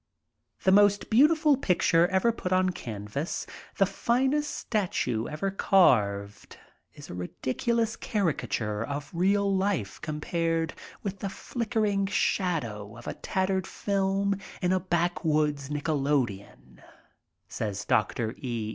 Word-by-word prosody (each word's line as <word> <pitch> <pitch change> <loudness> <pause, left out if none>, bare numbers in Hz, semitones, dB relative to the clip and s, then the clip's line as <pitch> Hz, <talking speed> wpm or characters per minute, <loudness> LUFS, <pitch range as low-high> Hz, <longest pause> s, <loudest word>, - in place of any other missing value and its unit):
"The 190 - +4
most 205 +1 +4
beautiful 300 +5 +5
picture 175 -6 +3
ever 190 +5 +2
put 185 -5 -5
on 185 0 +3
canvas, 110 - -4 0.3
the 195 - +5
finest 265 +8 +1
statue 130 - -1
ever 175 +6 -2
carved, 105 - +2 0.4
is - - -10
a - - -6
ridiculous 225 - -1
caricature 120 - -1
of 145 +3 -5
real 195 +3 +2
life 190 - -1
compared 165 +1 -1 0.3
with 200 -1 -4
the 200 - -3
flickering 215 -2 -1
shadow 120 - -1
of 120 - -12
a - - -3
tattered 190 0 -1
film 200 0 0 0.2
m 180 -1 +1
a 185 - +3
backwoods 155 -5 0
nickolodeon,*' 135 - -2 0.7
says 100 -2 -4
Dr. 110 +2 +1
E. 120 -6 -3
175 Hz, 115 wpm, -28 LUFS, 125-200 Hz, 0.7 s, beautiful